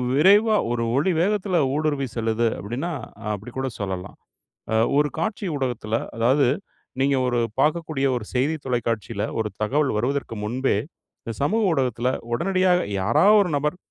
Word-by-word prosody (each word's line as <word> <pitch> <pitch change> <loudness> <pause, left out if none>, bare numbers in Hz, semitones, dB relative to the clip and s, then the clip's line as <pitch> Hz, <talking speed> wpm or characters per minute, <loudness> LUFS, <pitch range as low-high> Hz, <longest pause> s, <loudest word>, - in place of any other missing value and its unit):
விரைவா 205 +8 +5 0.2
ஒரு 120 -1 0
ஒளி 150 +8 +2
வேகத்துல 195 -1 +1 0.2
ஊடுருவி 150 -2 0
செல்லுது 115 0 +1
அப்படின்னா 125 +12 -4 0.4
அப்படி 105 +4 -7
கூட 135 0 -1
சொல்லலாம். 95 -2 -5 0.8
ஒரு 150 0 +3
காட்சி 205 +5 -2
ஊடகத்துல 120 -5 -2 0.2
அதாவது 130 +5 +3 0.5
நீங்க 135 +1 +3
ஒரு 125 -1 0 0.2
பார்க்கக்கூடிய 155 -2 +1
ஒரு 120 - -4
செய்தி 135 +5 +1
தொலைக்காட்சியில 115 -4 -2 0.2
ஒரு 110 -1 0
தகவல் 140 +6 +1
வருவதற்கு 125 +1 -1
முன்பே, 125 +2 0 0.5
இந்த 115 - -5
சமூக 215 +10 +2
ஊடகத்தில 125 -4 0 0.2
உடனடியாக 185 +4 +2
யாராவது 120 - +5
ஒரு 180 - -2
நபர், 150 +4 -1
135 Hz, 135 wpm, -23 LUFS, 115-165 Hz, 0.8 s, விரைவா